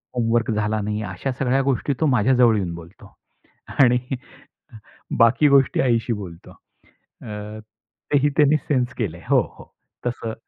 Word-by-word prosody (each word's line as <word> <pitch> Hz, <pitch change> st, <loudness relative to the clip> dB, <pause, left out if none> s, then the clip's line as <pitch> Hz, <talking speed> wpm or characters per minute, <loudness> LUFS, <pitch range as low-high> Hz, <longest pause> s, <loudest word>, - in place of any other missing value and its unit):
Homework 115 Hz, -1 st, +1 dB
झाला 105 Hz, 0 st, -1 dB
नाही, 105 Hz, +1 st, -3 dB
अशा 95 Hz, +7 st, -4 dB
सगळ्या 135 Hz, 0 st, +1 dB
गोष्टी 135 Hz, +1 st, 0 dB
तो 160 Hz, -, +2 dB
माझ्याजवळ 125 Hz, -2 st, +4 dB
येऊन 90 Hz, -4 st, -3 dB
बोलतो. 85 Hz, +2 st, -14 dB, 0.7 s
आणि 125 Hz, -2 st, +5 dB, 1.2 s
बाकी 115 Hz, +6 st, +5 dB
गोष्टी 135 Hz, -2 st, +3 dB
आईशी 120 Hz, -2 st, +1 dB
बोलतो. 95 Hz, -5 st, -9 dB, 0.5 s
अ, 105 Hz, 0 st, -9 dB, 0.5 s
तेही 145 Hz, 0 st, +3 dB
त्यांनी 150 Hz, 0 st, +4 dB
सेन्स 125 Hz, -5 st, -1 dB
केलंय. 90 Hz, -7 st, -3 dB
हो, -, -, +5 dB, 0.2 s
हो. -, -, -15 dB, 0.3 s
तसं. 120 Hz, -2 st, -3 dB
115 Hz, 130 wpm, -22 LUFS, 105-130 Hz, 1.2 s, आणि